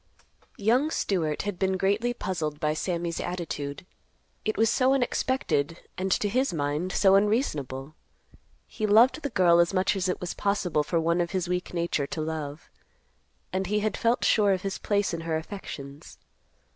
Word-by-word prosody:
Young 245 +9 +2
Stewart 165 - -1
had 205 -3 -4
been 190 -1 +1
greatly 205 +6 +1
puzzled 165 -10 -3
by 150 0 +1
Sammy's 170 +1 -2
attitude. 150 -4 -4 0.6
It 215 - -1
was 225 - +4
so 260 +4 +3
unexpected, 175 - 0 0.2
and, 190 +1 -2
to 210 - +1
his 255 +6 +1
mind, 150 +3 -1
so 195 -1 +4
unreasonable. 155 - 0 0.7
He 215 - -3
loved 235 +8 +5
the 285 - -2
girl 175 -6 +4
as 170 +3 +3
much 185 +2 +2
as 185 -1 -1
it 180 - -1
was 180 - -4
possible 200 -6 0
for 165 +3 0
one 170 +2 +1
of 170 - -1
his 185 -2 -1
weak 180 0 -2
nature 170 -5 -1
to 160 - -5
love; 155 -1 -5 0.8
and 190 0 -1
he 210 +2 +1
had 215 -1 -1
felt 235 +1 +1
sure 205 -3 +4
of 185 - -3
his 195 -1 -3
place 205 -3 0
in 165 - -3
her 165 -1 -1
affections. 150 -5 -8
185 Hz, 170 wpm, -27 LUFS, 160-205 Hz, 0.8 s, loved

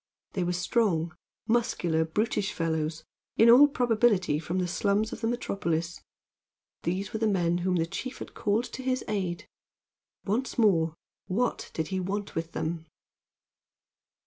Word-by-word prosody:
They 185 - 0
were 175 0 0
strong, 175 -4 +1 0.3
muscular, 215 -8 +1
brutish 205 +4 -1
fellows, 160 -1 -2 0.3
in 230 +1 +8
all 275 +5 +9
probability 225 - +2
from 170 +3 -3
the 180 -1 0
slums 205 +4 0
of - - -7
the 225 - 0
metropolis. 170 -8 -2 0.8
These 190 +3 -2
were 220 - -2
the 220 - +2
men 175 -4 +1
whom 180 +1 0
the 165 -2 +2
chief 255 +9 -5
had - - -8
called 210 +3 +1
to - - -5
his 255 0 -1
aid. 190 -5 -2 0.8
Once 230 +7 -1
more, 165 -8 +3 0.3
what 235 +6 -1
did 160 - -2
he 190 -1 -1
want 200 +2 -3
with 165 0 -4
them? 160 0 -3
190 Hz, 145 wpm, -28 LUFS, 170-225 Hz, 0.8 s, all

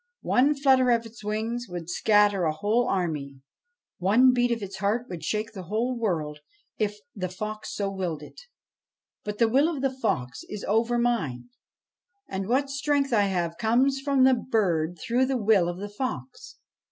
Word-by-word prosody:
One 280 +4 +3
flutter 265 -2 +4
of 235 -1 +2
its 225 -1 -12
wings 225 +3 -3
would 175 -2 -6
scatter 205 +1 +3
a 155 - +2
whole 215 +9 +1
army; 150 -7 -2 0.6
one 235 +8 +5
beat 245 0 +2
of 230 -3 -1
its 195 -1 -6
heart 210 +5 0
would 170 -3 -7
shake 215 +1 -2
the 195 -4 -8
whole 230 +7 -1
world 160 -10 -2 0.4
if 210 -1 -1 0.2
the 185 -3 -4
fox 215 +4 -6
so 200 -1 -2
willed 175 -6 -3
it. 150 - -12 0.8
But 210 0 -5
the 230 - +4
will 275 +8 +3
of 290 -5 -4
the 270 - +2
fox 130 - -2
is 210 - -6
over 230 +3 +2
mine, 235 - -1 0.8
and 190 0 -4
what 270 +4 +1
strength 280 -1 0
I 205 -3 +4
have 170 -3 -2
comes 255 +6 +2
from 275 -2 +3
the 260 0 +6
bird 180 -9 0
through 245 +9 +1
the 265 -1 0
will 205 -6 +3
of 175 - -5
the 205 +2 -5
fox. 205 - -6
215 Hz, 175 wpm, -26 LUFS, 185-245 Hz, 0.8 s, the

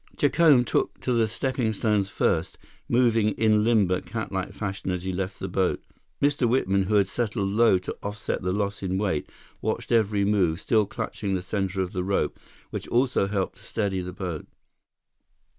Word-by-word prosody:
Jacome 145 -3 +5
took - - -1
to 125 - 0
the 115 -2 +3
steppingstones 110 -4 0
first, - - 0 0.3
moving 115 -3 +3
in 110 -1 +3
limber, 105 -6 +3
catlike 100 -4 -4
fashion 95 -2 -4
as 90 -1 -2
he 95 0 -2
left 95 +1 -3
the 95 - -3
boat. 95 0 0 0.4
Mr. 145 -4 +2
Whitman, 100 -6 +2
who 105 +2 +1
had 100 -2 +4
settled 105 -1 -1
low 110 -2 +5
to 90 - -5
offset 105 +1 -3
the 90 0 -1
loss 100 +1 -2
in 95 -1 -1
weight, 95 -7 -1 0.3
watched - - -2
every 105 -3 +3
move, 95 -5 +2
still 110 -1 +2
clutching 100 -1 -3
the 90 - -3
center 95 -1 -1
of 90 - -6
the 90 - -1
rope, 100 +1 -1 0.3
which - - -5
also 125 -4 +2
helped 95 -2 -2
to - - -18
steady 100 -4 -2
the 90 0 -5
boat. 90 -5 -5
100 Hz, 175 wpm, -26 LUFS, 95-115 Hz, 0.4 s, Jacome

